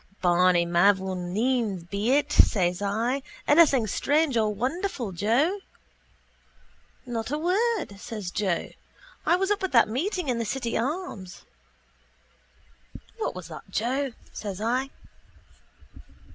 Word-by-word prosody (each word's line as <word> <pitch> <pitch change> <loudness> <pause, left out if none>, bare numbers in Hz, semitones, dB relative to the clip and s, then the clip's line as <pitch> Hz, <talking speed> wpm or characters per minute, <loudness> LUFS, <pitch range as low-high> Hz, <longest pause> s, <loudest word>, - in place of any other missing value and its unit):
—Barney 175 0 +4
mavourneen's 190 +4 +1
be 200 +6 -2
it, 290 0 +2
says 180 -2 +3
I. 230 +7 0 0.3
Anything 290 -6 +5
strange 290 +6 +1
or 215 -2 +2
wonderful, 255 - -2
Joe? 240 - +1 1.5
—Not 235 -2 -4
a 295 - -1
word, 370 - 0
says 205 -4 -6
Joe. 190 -5 -1 0.6
I 345 - +5
was 385 +2 0
up 415 - +1
at 380 - -2
that 230 - +6
meeting 340 - -2
in 245 -2 0
the - - 0
City 235 +1 -3
Arms. 250 - -4 1.7
—What 440 - -2
was 185 -2 -7
that, 160 +4 -10
Joe? 255 +6 -1 0.2
says 200 -3 -5
I. 250 +5 0
230 Hz, 115 wpm, -26 LUFS, 195-285 Hz, 1.7 s, that